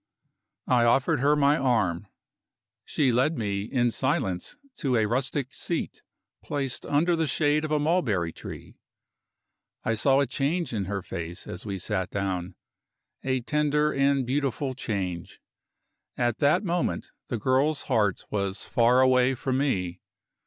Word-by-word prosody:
I 125 -2 +3
offered 135 +5 +3
her 145 +3 +4
my 145 0 +4
arm. 105 -8 +1 0.8
She 140 -5 +1
led 130 +7 +2
me 100 -3 -2
in 120 0 +1
silence 130 - -1 0.2
to 135 -6 0
a 110 - +3
rustic 130 +4 -1
seat, - - -3 0.4
placed 135 -3 -3
under 165 +4 +2
the 160 -1 0
shade 150 +2 +2
of 155 - -2
a 155 - +2
mulberry 125 - +1
tree. - - -10 1.0
I 115 - +1
saw 135 +5 +4
a 140 - +3
change 140 +5 -1
in 100 -4 -1
her 95 0 -3
face 85 -2 -6
as 95 - -7
we 100 -1 -3
sat 95 0 -2
down 95 -2 -3 0.7
a 130 -1 0
tender 150 +2 +1
and 140 -1 +2
beautiful 135 0 -1
change. 95 -8 -4 0.8
At 120 -2 0
that 155 +8 +3
moment 175 -2 -1 0.2
the 120 - -2
girl's 135 +6 +1
heart 105 -7 0
was 100 -1 -2
far 120 +2 +3
away 130 0 +4
from 130 +1 -1
me. 90 -11 -1
130 Hz, 145 wpm, -26 LUFS, 105-145 Hz, 1.0 s, her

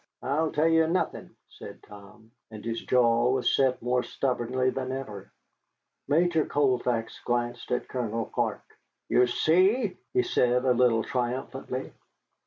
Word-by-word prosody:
"I 155 +5 0
tell 155 +2 +1
you 160 0 +4
nothin'," 180 +3 -2
said - - -12
Tom, 105 +2 -15 0.2
and 110 -1 -10
his 115 0 -3
jaw 120 -1 +3
was 130 -1 +1
set 130 -3 +1
more 125 +1 +1
stubbornly 130 0 -1
than 130 -1 -4
ever. 120 -7 -7 0.8
Major 160 +2 +2
Colfax 125 -5 0
glanced 120 0 -2
at 125 - -1
Colonel 115 -3 -3
Clark. - - -2 0.5
"You 125 0 +4
see!" 185 - +2
he 375 0 +2
said 125 - +1
a 125 - +4
little 120 -2 +3
triumphantly. 130 0 -4
125 Hz, 135 wpm, -27 LUFS, 120-145 Hz, 0.8 s, you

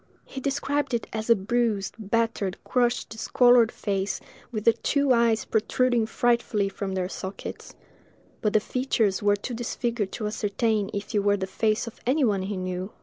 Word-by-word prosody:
He 265 - -7
described 280 -1 -1
it 230 - -2
as 220 +1 -4
a 230 - +8
bruised, 215 -1 0
battered, 215 -2 -1
crushed, 245 -1 +1
discolored 240 +1 +4
face, 195 -1 -2 0.3
with 215 -3 -3
the 230 - +6
two 280 +3 +2
eyes 235 -2 +2
protruding 235 +1 +1
frightfully 235 -4 +1
from 195 0 -4
their 185 -1 -1
sockets; 190 0 -7 0.7
but 210 - +1
the 215 - +5
features 225 -4 0
were 205 0 +4
too 225 +5 -6
disfigured 235 -3 -2
to 215 - -4
ascertain 210 0 0
if 200 +3 -5
it 210 - +3
were 205 0 +2
the 190 - -2
face 215 +3 0
of 230 - -10
any 280 +3 +3
one 200 -4 +1
he 195 +1 -3
knew. 185 +1 -4
220 Hz, 170 wpm, -26 LUFS, 200-240 Hz, 0.7 s, a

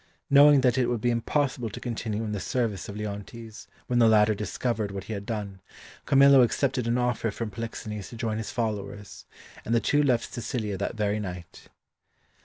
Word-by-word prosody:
Knowing 145 0 +7
that 125 -1 +2
it 125 - +2
would 120 -1 -1
be 120 +2 +1
impossible 125 0 -1
to - - -8
continue 110 -2 -3
in 110 - -4
the 105 - -3
service 110 -5 -2
of 100 - -7
Leontes 105 +2 -7 0.2
when 120 -1 +1
the 115 - +6
latter 110 -1 +5
discovered 105 +1 -2
what 100 -1 -6
he 110 - -6
had 100 -1 -6
done, 100 -4 -4 0.5
Camillo 140 -1 +7
accepted 125 +1 +1
an 120 +1 +1
offer 120 -2 0
from 110 +1 -5
Polixenes 105 -3 -6
to - - -10
join 115 -2 -2
his 110 - -5
followers, 105 -3 -5 0.4
and 115 - 0
the - - +4
two 145 +5 +2
left 125 -5 0
Sicilia 110 -4 -3
that 100 +4 -3
very 105 -1 0
night. 90 -4 -8
115 Hz, 190 wpm, -27 LUFS, 105-120 Hz, 0.5 s, Knowing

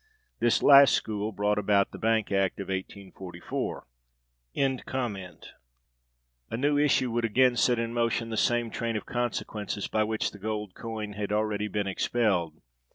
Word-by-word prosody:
This 120 - +2
last 140 -1 +8
school 105 0 -2
brought 105 +1 0
about 100 -1 +2
the - - -9
Bank 110 -2 +1
Act 95 -1 +1
of 100 - -6
1844.(284) 90 - -5 1.1
[A] 115 - -3
new 145 +3 +1
issue 135 -4 +2
would 120 +1 -1
again 125 +3 +3
set 120 +1 +3
in 115 0 -2
motion 115 -1 0
the - - -2
same 120 0 +1
train 115 -1 -3
of 105 - -3
consequences 110 -4 -3
by 110 - +1
which 110 0 -1
the 100 - -13
gold 105 -1 -4
coin 110 -2 -6
had 105 0 -4
already 105 0 0
been 105 -1 -2
expelled. 95 -5 0
105 Hz, 150 wpm, -28 LUFS, 100-115 Hz, 1.1 s, last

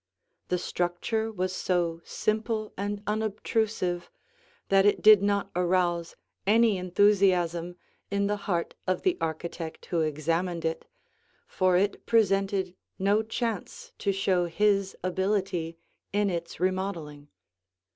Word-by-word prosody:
The 180 - 0
structure 180 +6 -2
was 185 -2 -2
so 170 -3 0
simple 215 0 -2
and 205 +1 -3
unobtrusive 210 -4 -1 0.6
that 195 0 +5
it 205 - +2
did 215 -2 +9
not 200 -1 0
arouse 175 -1 +1 0.3
any 220 -1 +4
enthusiasm 180 -2 +2 0.3
in 200 0 0
the 205 +1 +1
heart 170 -2 0
of 185 - 0
the 370 -1 +2
architect 160 0 -4
who 170 - +3
examined 165 +3 -1
it, 160 0 -2 0.6
for 185 -1 +2
it 200 +2 0
presented 195 -4 +2 0.2
no 200 +3 +2
chance 235 - -4
to 200 - +1
show 185 -2 +1
his 200 +2 +1
ability 185 -3 -1 0.3
in 205 -1 +1
its 170 -1 -5
remodeling. 175 -6 -2
190 Hz, 115 wpm, -28 LUFS, 175-205 Hz, 0.6 s, did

